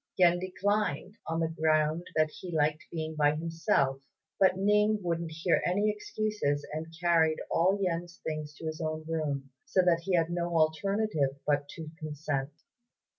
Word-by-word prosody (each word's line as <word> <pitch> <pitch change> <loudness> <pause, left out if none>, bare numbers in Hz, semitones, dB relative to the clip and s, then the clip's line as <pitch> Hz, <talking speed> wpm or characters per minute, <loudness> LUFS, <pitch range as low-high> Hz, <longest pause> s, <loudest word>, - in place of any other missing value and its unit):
Yen 175 -1 +5
declined, 195 -1 -1
on 165 0 -1
the 165 - +1
ground 155 +1 +1
that 155 -1 +3
he 180 +2 -8
liked 155 -1 +1
being 160 -1 -4
by 150 -1 +3
himself; 165 -4 0 0.4
but 185 -1 +5
Ning 210 +2 +3
wouldn't 170 -1 -1
hear 165 +2 +1
any 205 +4 +2
excuses, 210 -8 -2
and 160 +1 -5
carried 165 -2 +3
all 185 +4 +3
Yen's 175 -2 -2
things 155 -1 -4
to 160 - -9
his 155 +1 -4
own 155 0 -3
room, 145 -4 -2
so 185 - +2
that 175 -2 +4
he 190 -2 +2
had 165 0 +2
no 175 -1 -1
alternative 160 -2 +1
but 145 -1 +1
to 155 0 -8
consent. 150 -3 -3
165 Hz, 160 wpm, -30 LUFS, 155-180 Hz, 0.4 s, Yen